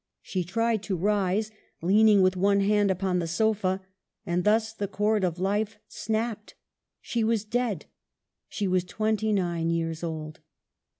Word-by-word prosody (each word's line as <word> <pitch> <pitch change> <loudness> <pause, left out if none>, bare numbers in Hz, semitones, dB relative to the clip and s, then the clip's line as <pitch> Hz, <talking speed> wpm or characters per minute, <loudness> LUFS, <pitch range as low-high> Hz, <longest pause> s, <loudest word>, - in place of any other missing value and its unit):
She 185 -2 -2
tried 225 +4 0
to 195 -2 -2
rise, 205 +2 +1 0.3
leaning 205 +3 +5
with 185 0 +3
one 200 +2 +3
hand 205 0 +3
upon 185 -1 0
the 170 - -2
sofa. 195 0 0 0.4
And 175 -1 0
thus 220 +2 +2
the 205 -2 -3
chord 210 +1 +1
of 175 -2 0
life 205 +3 -1
snapped. 220 -1 -3 0.5
She 235 -2 -1
was 220 -1 +1
dead. 230 -6 -1 0.6
She 205 - -2
was 185 -1 +2
twenty 215 +3 -1
nine 175 -4 0
years 165 -1 -2
old. 155 -2 -5
200 Hz, 145 wpm, -27 LUFS, 180-215 Hz, 0.6 s, leaning